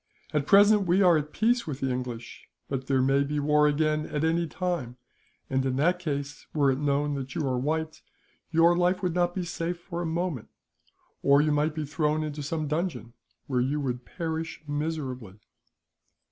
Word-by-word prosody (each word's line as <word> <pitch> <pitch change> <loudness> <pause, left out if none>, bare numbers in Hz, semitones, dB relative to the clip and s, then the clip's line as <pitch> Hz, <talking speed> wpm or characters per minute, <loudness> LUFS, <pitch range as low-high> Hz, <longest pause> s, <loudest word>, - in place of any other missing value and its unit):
At 150 -1 0
present 205 0 +6
we 185 +3 +4
are 175 -2 +6
at 150 -1 -1
peace 235 +3 +1
with 140 -3 -4
the 135 -1 0
English; 125 -2 -6 0.2
but 130 -1 -4
there 130 -2 +2
may 135 +1 +3
be 145 +1 -2
war 150 +1 +4
again, 155 +1 +1
at 150 0 -2
any 165 +1 +1
time, 155 -8 -3 0.5
and 130 0 0
in 130 -1 -1
that 175 +6 +2
case 145 -4 -4
were 140 -3 +4
it 130 - -1
known 145 0 +1
that 135 -2 -5
you 150 - -1
are 130 -1 0
white, 160 +3 -2 0.5
your 170 +1 +4
life 180 +3 +1
would 180 -2 0
not 175 0 +1
be 185 - -1
safe 175 0 -3
for 170 0 -5
a - - -2
moment; 165 -7 -2 0.7
or 140 0 +5
you 150 +1 +2
might 150 +1 +1
be 155 -1 -2
thrown 155 +1 0
into 150 -1 -4
some 155 +2 -2
dungeon, 155 -6 -3 0.3
where 125 -3 0
you 140 +4 0
would 125 -3 -3
perish 160 +1 -5
miserably." 140 -9 -4
150 Hz, 190 wpm, -27 LUFS, 140-170 Hz, 0.7 s, present